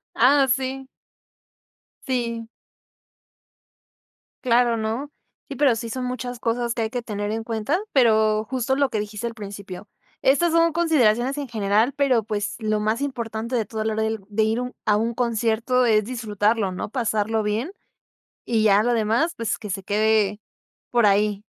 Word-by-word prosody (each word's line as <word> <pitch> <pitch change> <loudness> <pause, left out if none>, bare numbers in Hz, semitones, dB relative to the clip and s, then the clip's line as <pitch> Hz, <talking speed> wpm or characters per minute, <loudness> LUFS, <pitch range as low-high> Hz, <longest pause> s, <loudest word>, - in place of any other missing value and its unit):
Ah, 270 +3 +5
sí. 265 +1 -1 1.2
Sí. 235 -3 -2 2.0
Claro, 240 -1 +3
¿no? 225 +6 -3 0.4
Sí, 275 - -5
pero 270 -3 +3
sí 230 +1 -5
son 255 +2 -3
muchas 250 -1 -4
cosas 235 0 -1
que 235 - -3
hay 220 - -1
que 245 0 -4
tener 205 -2 -4
en 225 +1 -3
cuenta, 225 - -1
pero, 220 -4 +4
justo, 260 0 0
lo 280 -1 +2
que 215 - -2
dijiste 210 +2 -4
al 230 - -7
principio. 200 -2 -8 0.4
Estas 285 +6 +3
son 335 0 +3
consideraciones 270 -6 +2
en 285 - -4
general, 220 +2 +1
pero, 270 -5 +2
pues, 205 -1 -3
lo 215 -2 -1
más 215 +4 -1
importante 235 -3 -3
de 225 -3 0
toda 220 0 -4
la 220 - 0
hora 220 - -1
d 220 0 -1
de 215 +1 +1
ir 220 +2 +1
un 250 0 -5
a 210 -1 +3
un 230 +2 -1
concierto 235 +1 +1
es 215 -3 +3
disfrutarlo, 215 -3 0
¿no? 185 - -5
Pasarlo 220 -2 0
bien, 215 - -2 0.7
y 225 -2 +1
ya 205 -1 +5
lo 240 +2 +1
demás, 230 +9 +1
pues, 230 -1 -2
que 210 - -8
se 195 0 -4
quede 210 0 +1 0.5
por 235 -3 +3
ahí. 205 0 +2
230 Hz, 165 wpm, -23 LUFS, 215-250 Hz, 2.0 s, Ah